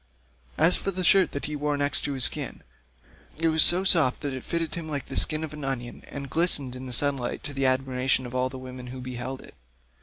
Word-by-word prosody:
153 160 - +4
As 180 - +1
for - - -1
the 185 - -1
shirt 190 +1 +4
that 140 - -5
he 150 - -4
wore 145 0 -1
next 145 0 +1
his 135 -3 0
skin, - - -2 0.7
it 165 +1 +1
was 160 0 +3
so 180 +4 +8
soft 160 -9 +4
that 145 -2 -3
it 130 - -6
fitted 165 -2 -3
him 165 -2 -6
like 145 -3 -3
the - - -8
skin 155 0 +2
of 155 -2 -6
an 150 -1 -8
onion, 120 -3 -4
and 140 -1 -7
glistened 145 -4 +1
in 130 +1 -8
the - - -7
sunlight 135 0 0
to 145 - -4
the 135 -1 +1
admiration 130 0 +1
of 120 - -8
all 130 0 0
the 130 - -9
women 130 -1 -9
who 130 +1 -8
beheld 125 +1 -6
it. - - -14
140 Hz, 240 wpm, -26 LUFS, 130-155 Hz, 0.7 s, so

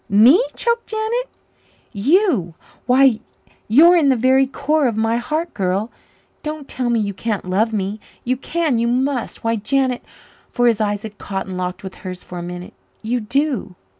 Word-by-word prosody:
Me!" 240 - +6
choked 470 0 0
Janet. 445 +3 -2 0.6
"You. 245 - +2 0.3
Why, 255 -2 +5 0.5
you're 320 +11 +7
in 310 -5 +4
the 265 - +4
very 260 +3 +3
core 290 +2 +1
of 225 -3 -2
my 225 +1 +1
heart, 310 +7 -2
girl. 195 +3 -1 0.5
Don't 305 -2 -5
tell 250 -1 -2
me 235 -1 +2
you 200 -2 -1
can't 210 0 -3
love 205 +5 +1
me 205 0 -2 0.2
you 255 +1 0
can 305 -1 -1
you 235 - +1
must 255 +1 -1
why, 230 0 +1
Janet," 255 +3 0 0.5
for 245 - 0
his 230 -2 +3
eyes 205 -1 -1
had 215 -2 -9
caught 195 -1 -4
and 190 - -6
locked 180 +1 -4
with 190 - -7
hers 185 -2 -7
for 180 - -8
a - - -5
minute, 180 +1 -7 0.3
"you 240 +3 0
do!" 250 -3 -1
235 Hz, 175 wpm, -20 LUFS, 205-280 Hz, 0.6 s, you're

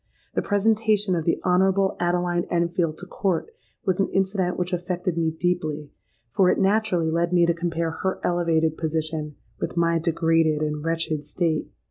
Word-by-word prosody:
The - - 0
presentation 210 -1 +2
of 165 -3 -1
the 165 - +1
Honourable 190 +2 +3
Adeline 175 0 0
Enfield 170 -2 0
to 180 - -5
court 185 - -2 0.3
was 185 -1 +1
an 195 - +2
incident 190 -2 0
which 180 +1 -2
affected 180 0 -2
me 165 -1 +1
deeply; 155 -3 -2 0.4
for 185 +5 +3
it - - +2
naturally 195 -5 +2
led 170 +1 0
me 175 -1 +4
to 170 - +2
compare 165 -1 -2
her 190 +4 -2
elevated 165 -2 +1
position 155 -1 -2 0.2
with - - -4
my 170 0 +2
degraded 165 -2 +2
and 150 -1 -2
wretched 165 -2 -1
state. 155 +1 -1
170 Hz, 160 wpm, -24 LUFS, 160-185 Hz, 0.4 s, me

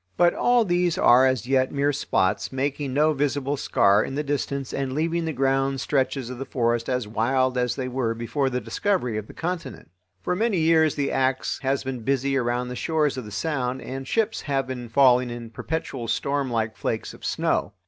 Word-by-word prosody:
But 175 0 +4
all 245 -2 +3
these 175 -2 +1
are 130 +2 +6
as 130 -5 0
yet 130 0 +2
mere 140 +1 +1
spots, 100 -7 0
making 140 +1 -2
no 150 +3 +3
visible 145 0 -1
scar 100 -6 +3
in 135 - -5
the 150 - -1
distance 140 -2 -3
and 135 -1 -2
leaving 165 +3 0
the 160 - -1
grand 135 0 +1
stretches 135 -2 -1
of 125 - -7
the - - -2
forest 120 -2 0
as 125 -4 -1
wild 130 +4 +1
as 125 -1 0
they 130 -2 -3
were 125 -3 -1
before 135 +4 -1
the 125 -1 -1
discovery 125 - -1
of 105 - -9
the - - -13
continent. 170 - -5 0.3
For 180 - 0
many 215 0 +1
years 160 -1 +3
the 140 -1 -1
axe 130 0 0
has 135 0 0
been 130 -2 -4
busy 135 +3 0
around 125 -1 0
the 125 - -5
shores 150 0 0
of 130 -3 -5
the 105 - -9
Sound 130 +2 -2
and 135 +1 -6
ships 225 +4 0
have 135 -3 -1
been 125 -2 -6
falling 125 0 +4
in 120 -1 -7
perpetual 135 -3 -4
storm 140 +3 -1
like 110 -2 -1
flakes 110 - -3
of - - -15
snow. 95 - 0
135 Hz, 200 wpm, -24 LUFS, 125-145 Hz, 0.3 s, are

